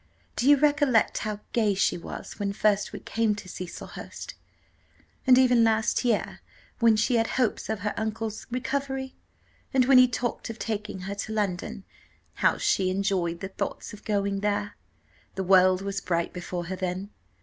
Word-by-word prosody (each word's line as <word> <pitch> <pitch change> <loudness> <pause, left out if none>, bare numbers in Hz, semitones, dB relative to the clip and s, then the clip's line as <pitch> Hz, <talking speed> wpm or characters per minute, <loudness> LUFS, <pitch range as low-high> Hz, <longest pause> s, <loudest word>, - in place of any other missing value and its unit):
Do 255 - +2
you 290 - +8
recollect 285 -5 +3
how 210 -1 -4
gay 215 -4 +2
she 195 - +2
was 170 - -8
when 200 -1 -1
first 205 -1 +1
we - - -7
came 225 -2 0
to 205 - -9
Cecilhurst? 180 -1 -8 0.9
and 255 -1 +8
even 250 -2 +5
last 225 +2 +2
year, 235 -4 0 0.4
when 230 -2 +5
she 235 +3 +2
had 225 0 +2
hopes 250 -5 -1
of 220 -3 -2
her 210 +1 -1
uncle's 220 0 -4
recovery, 265 +1 -3 0.6
and 255 -2 +5
when 260 0 +7
he 255 - +7
talked 240 0 -3
of 225 - -6
taking 210 -4 -4
her 195 +2 -4
to 205 +2 -4
London, 195 -2 -2 0.6
how - - +4
she 185 -1 +1
enjoyed 185 -3 -1
the 195 - -4
thoughts 195 - -5
of 210 - -11
going 200 -2 0
there! 205 0 -1 0.6
The 190 - -2
world 185 0 +5
was 200 0 -3
bright 170 -2 -1
before 175 -1 -5
her 185 +3 -4
then. 185 +2 -4
210 Hz, 170 wpm, -27 LUFS, 195-235 Hz, 0.9 s, you